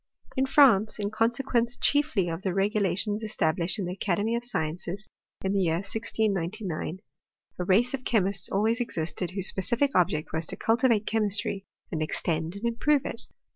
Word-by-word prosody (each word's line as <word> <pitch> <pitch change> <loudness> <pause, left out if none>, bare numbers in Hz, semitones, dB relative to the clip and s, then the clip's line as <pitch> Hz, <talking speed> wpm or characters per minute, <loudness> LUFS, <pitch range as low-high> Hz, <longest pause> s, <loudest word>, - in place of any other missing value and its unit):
In 265 +1 +1
France, 230 -8 +5
in 205 -1 -2
consequence 235 +1 +1
chiefly 285 - +2
of 165 +1 -4
the 190 - -1
regu 200 +3 +1
lations 205 +3 0
established 175 -4 0
in 200 - -2
the 180 - -3
Academy 205 +4 0
of 235 - -2
Sciences, 180 -2 -4 0.4
in 190 - +1
the 200 - +2
year 165 -3 +2
1699, 195 -3 -2 0.6
a - - 0
race 220 +8 +3
of 265 -2 -3
chemists 200 -5 +1
always 220 +4 +1
existed, 170 -6 -3
whose 190 0 0
specific 240 +8 +1
object 155 -4 +1
was 160 0 -1
to - - -4
cultivate 225 -2 +2
chemistry, 205 -2 0 0.2
and 160 -4 -2
extend 160 +2 -2
and 200 +3 -6
improve 275 +5 +2
it. - - 0
200 Hz, 165 wpm, -27 LUFS, 180-230 Hz, 0.6 s, France